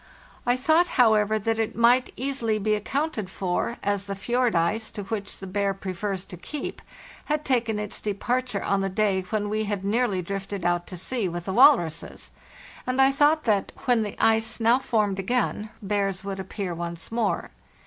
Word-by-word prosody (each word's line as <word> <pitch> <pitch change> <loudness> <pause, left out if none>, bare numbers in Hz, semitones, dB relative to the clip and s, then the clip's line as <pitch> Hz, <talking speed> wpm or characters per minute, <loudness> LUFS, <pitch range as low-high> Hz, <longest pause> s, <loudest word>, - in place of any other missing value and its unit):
I 245 +1 +3
thought, 315 +7 +3
however, 220 -3 +4
that 225 +1 -1
it 225 - -1
might 245 +2 +4
easily 250 -5 0
be 215 +1 +1
accounted 220 0 -2
for, 190 +5 -2
as 200 0 -1
the 200 - -3
fjord 240 +2 0
ice, 205 +7 +1
to 205 - -6
which 200 0 -4
the 195 - -8
bear 195 +1 -1
prefers 190 0 -4
to 180 - -10
keep, 275 - -6 0.4
had 300 0 -1
taken 235 -4 +1
its 210 -1 -5
departure 235 +2 -1
on 195 0 +1
the 195 - 0
day 195 -1 +1
when 210 -1 -1
we 215 +1 -1
had 200 -2 -3
nearly 205 -3 +1
drifted 195 0 -5
out 175 0 +1
to 180 - -7
sea 210 +2 -1
with 175 0 -5
the 190 - -2
walruses, 230 - +3 0.6
and 255 +1 -1
I 270 0 +6
thought 295 +3 +3
that, 205 -4 +1
when 245 -3 +3
the 210 -1 -4
ice 225 +1 +3
now 235 +3 +4
formed 210 -6 0
again, 215 0 -1
bears 195 -2 -1
would 195 -1 -4
appear 190 -1 -4
once 170 +2 -5
more. 230 -2 -1
210 Hz, 180 wpm, -25 LUFS, 195-240 Hz, 0.6 s, I